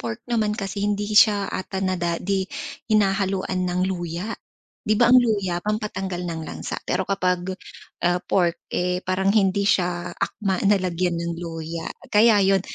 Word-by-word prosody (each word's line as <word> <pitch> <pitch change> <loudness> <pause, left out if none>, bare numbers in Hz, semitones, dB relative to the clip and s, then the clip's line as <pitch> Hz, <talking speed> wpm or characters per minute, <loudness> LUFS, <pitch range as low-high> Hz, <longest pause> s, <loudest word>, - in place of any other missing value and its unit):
pork 115 -2 -5
naman 215 -2 +1
kasi 200 0 -4
hindi 205 +1 -1
siya 205 -2 +5
ata 190 0 -4
nada 175 -2 0
di 195 +1 -1 0.4
hinahaluan 195 -3 +1
ng 180 +1 -1
luya. 180 +2 -3 0.5
'Di 215 0 +1
ba 240 +1 +5
ang 255 - +9
luya, 200 -7 0
pangpatanggal 195 -4 -3
ng 165 -2 -4
lansa. - - -5
Pero 190 - +1
kapag, 180 -1 0 0.5
ah, 175 +1 +2
pork, 175 -3 +1 0.2
eh, 180 +1 -1
parang 185 +1 0
hindi 200 -1 +3
siya 175 -1 +1
akma 195 -3 -2
na 205 +1 +5
lagyan 175 -1 -1
ng 170 0 -2
luya. 165 -1 -5 0.2
Kaya 210 0 +5
yun, 195 0 +4
190 Hz, 155 wpm, -23 LUFS, 175-205 Hz, 0.5 s, ang